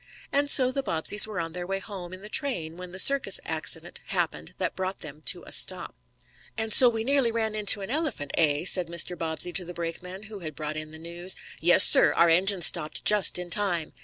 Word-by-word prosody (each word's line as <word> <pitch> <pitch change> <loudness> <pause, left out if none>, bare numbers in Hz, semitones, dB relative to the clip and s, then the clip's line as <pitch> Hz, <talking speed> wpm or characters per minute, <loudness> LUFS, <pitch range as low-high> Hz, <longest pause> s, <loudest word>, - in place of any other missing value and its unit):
And 285 +1 -1
so 255 -3 +6
the 275 - -4
Bobbseys 205 0 +4
were 210 -4 -7
on 165 -1 -6
their 175 0 -8
way 195 +1 -4
home 195 -3 -11
in 185 +1 -12
the - - -10
train 185 - -3
when 180 0 -12
the 185 - -11
circus 275 +8 +3
accident - - -3
happened - - -5
that - - -5
brought 190 +1 -6
them 150 0 -12
to - - -1
a - - -14
stop. - - +2 0.6
"And 220 -1 +1
so 250 +2 +7
we 225 -1 -5
nearly 270 -2 0
ran 220 -1 -4
into 210 -1 +2
an 195 - -8
elephant, 290 - -4
eh?" 150 0 -1
said 180 -2 +3
Mr. 170 +1 -1
Bobbsey 165 +1 -3
to 185 - -2
the 175 0 -11
brakeman, 180 +3 -8
who 215 -2 -12
had 155 -4 -9
brought 155 0 -6
in 155 0 -7
the 160 - -13
news. 170 +3 -3 0.2
"Yes, 175 +2 +5
sir. - - +6
Our 170 - +2
engineer 185 +2 +2
stopped 160 -2 +1
just 210 -3 +4
in 180 -1 -9
time." 175 -6 -2
180 Hz, 220 wpm, -24 LUFS, 165-215 Hz, 0.6 s, so